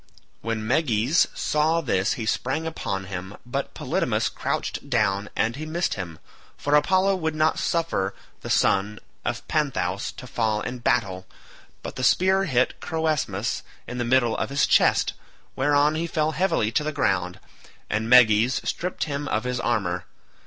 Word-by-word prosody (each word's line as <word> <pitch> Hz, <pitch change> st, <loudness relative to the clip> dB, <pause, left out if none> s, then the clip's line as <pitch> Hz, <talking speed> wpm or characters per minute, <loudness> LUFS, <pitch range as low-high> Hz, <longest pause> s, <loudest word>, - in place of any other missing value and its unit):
When 115 Hz, -1 st, -3 dB
Meges 130 Hz, +2 st, +2 dB
saw 155 Hz, +2 st, +1 dB
this 100 Hz, -, +1 dB
he 115 Hz, -, -4 dB
sprang 135 Hz, +8 st, -1 dB
upon 100 Hz, -12 st, -3 dB
him, 95 Hz, +1 st, -7 dB
but 135 Hz, +3 st, -4 dB
Polydamas -, -, 0 dB
crouched -, -, -3 dB
down, 100 Hz, +2 st, +1 dB
and 115 Hz, +1 st, 0 dB
he 155 Hz, -, -5 dB
missed 170 Hz, +2 st, -1 dB
him, 85 Hz, -5 st, -6 dB, 0.4 s
for 145 Hz, -, -1 dB
Apollo 185 Hz, +6 st, +4 dB
would 160 Hz, -3 st, -2 dB
not 155 Hz, +1 st, +2 dB
suffer 165 Hz, -, -1 dB, 0.3 s
the -, -, -7 dB
son 100 Hz, +2 st, +2 dB, 0.3 s
of -, -, -3 dB
Panthous 120 Hz, -, -1 dB
to -, -, -10 dB
fall 105 Hz, 0 st, 0 dB
in 125 Hz, 0 st, -5 dB
battle; 95 Hz, -5 st, 0 dB, 0.6 s
but -, -, -7 dB
the 130 Hz, -, -3 dB
spear 190 Hz, +8 st, +3 dB
hit 130 Hz, -6 st, +1 dB
Croesmus 160 Hz, -2 st, -1 dB, 0.2 s
in 125 Hz, +1 st, -6 dB
the -, -, +1 dB
middle 120 Hz, -1 st, +2 dB
of -, -, -2 dB
his 140 Hz, +1 st, +2 dB
chest, -, -, +3 dB, 0.4 s
whereon 145 Hz, +2 st, +3 dB
he 165 Hz, +2 st, -2 dB
fell 155 Hz, -1 st, 0 dB
heavily 160 Hz, -, +1 dB
to 150 Hz, -, +1 dB
the 155 Hz, -, -2 dB
ground, 90 Hz, -9 st, 0 dB, 0.5 s
and 110 Hz, +2 st, -1 dB
Meges 120 Hz, -1 st, +6 dB
stripped 180 Hz, +1 st, -2 dB
him 145 Hz, -1 st, -3 dB
of 110 Hz, -, 0 dB
his 125 Hz, -1 st, -2 dB
armour. 95 Hz, -8 st, -1 dB
125 Hz, 160 wpm, -24 LUFS, 105-155 Hz, 0.6 s, Meges